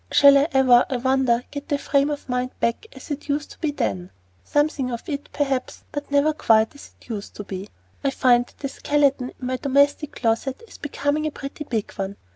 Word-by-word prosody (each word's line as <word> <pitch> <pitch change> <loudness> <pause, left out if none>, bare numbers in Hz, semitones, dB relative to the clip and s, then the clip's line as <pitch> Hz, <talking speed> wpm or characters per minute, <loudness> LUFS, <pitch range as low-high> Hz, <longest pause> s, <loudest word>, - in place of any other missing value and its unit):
Shall 280 -1 +8
I 280 +2 +4
ever, 255 -2 +6
I 260 - 0
wonder, 255 -1 +2
get 285 +2 -7
the 290 - +2
frame 280 0 +2
of 290 -1 -4
mind 250 0 -2
back 235 - -1
as - - -11
it 290 +1 -5
used 290 +1 -1
to - - -14
be 315 - 0
then? 95 - -2 0.3
Something 290 - +1
of 235 -2 -5
it, 285 -2 -4
perhaps, 275 -3 -2
but 290 0 -5
never 285 +2 +3
quite 225 -6 +3
as 285 - -14
it - - -20
used 210 -3 -6
to 205 - -6
be. 195 0 -7 0.3
I 275 - +3
find 245 -2 +3
that - - -22
the 275 - -3
skeleton 275 -2 +1
in 255 - -6
my 255 0 -1
domestic 285 +2 +2
closet 250 - -1
is - - -14
becoming 290 +1 -1
a - - -3
pretty 285 +1 -7
big 225 -6 -2
one. 195 0 -4
275 Hz, 215 wpm, -23 LUFS, 245-290 Hz, 0.3 s, Shall